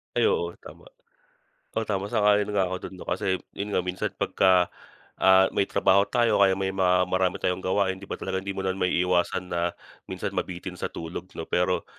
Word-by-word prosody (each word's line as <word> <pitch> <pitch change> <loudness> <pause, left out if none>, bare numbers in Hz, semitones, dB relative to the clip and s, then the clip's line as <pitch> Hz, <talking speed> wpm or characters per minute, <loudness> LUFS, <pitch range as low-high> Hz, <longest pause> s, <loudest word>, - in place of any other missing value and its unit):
Ay - - +2
oo, 450 -1 -2
tama. - - -13 0.9
Oh, 110 - 0
tama 100 -1 -2
sang-ayon 105 -2 +3
nga 100 -2 +2
ako 90 0 -3
do'n - - -12
'no, - - -10
kasi 95 0 0 0.2
'yon 100 +1 -4
nga 90 -3 0
minsan 90 0 -2
pagka, 95 -2 +3 0.6
ah, 95 0 +7
may 100 - +1
trabaho 100 0 +4
tayo 115 -4 +2
kaya 95 -1 +4
may 95 0 -1
marami 90 -1 +2
tayong 90 0 -1
gawain 95 0 0
di 100 - -11
ba, - - -3
talagang 95 0 -3
hindi 100 0 -5
mo 95 - -2
na 95 - +1
maiiwasan 90 -1 0
na, 85 0 +1 0.4
minsan - - -4
mabitin 90 0 -4
sa 90 - -4
tulog 85 +2 -7
'no 80 - -4
pero, 90 +1 0
95 Hz, 190 wpm, -26 LUFS, 90-100 Hz, 0.9 s, ah